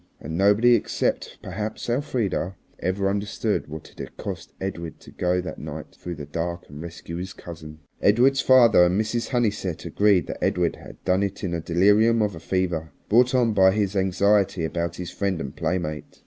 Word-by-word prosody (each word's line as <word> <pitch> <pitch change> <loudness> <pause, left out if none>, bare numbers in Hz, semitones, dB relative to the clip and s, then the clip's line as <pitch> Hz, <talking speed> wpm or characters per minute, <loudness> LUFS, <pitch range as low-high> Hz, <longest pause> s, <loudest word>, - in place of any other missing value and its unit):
And 80 +3 -6
nobody, 105 +6 +5
except 120 - -1
perhaps 105 +4 -5
Elfrida, 120 - -1 0.2
ever 95 +2 0
understood 100 +2 -1
what 80 +1 -9
it - - -21
had - - -8
cost - - -6
Edred 85 -4 -5
to - - -14
go 90 0 0
that 90 - -7
night 75 0 -7
through 90 -1 -6
the 75 -2 -7
dark 85 +4 -4
and 75 +1 -9
rescue 85 0 -7
his 95 +2 -5
cousin. 80 -2 -10 0.2
Edred's 130 +6 +4
father 120 -8 +6
and 90 +3 +1
Mrs. 110 +1 -1
Honeysett 105 - -1
agreed 100 -3 +3
that - - -6
Edred - - +1
had - - -14
done 95 +1 +2
it 100 0 -3
in 90 - -1
the 85 -1 -2
delirium 105 +7 +4
of 105 -2 -1
a 80 - -8
fever, 85 -3 -1 0.2
brought 125 +4 +4
on 120 -3 +3
by 95 -2 +6
his 100 -1 0
anxiety 95 -1 +2
about 85 +1 -2
his 90 -1 -6
friend 100 -4 -1
and 70 -4 -6
playmate. 75 -5 -3
95 Hz, 185 wpm, -24 LUFS, 85-105 Hz, 0.2 s, father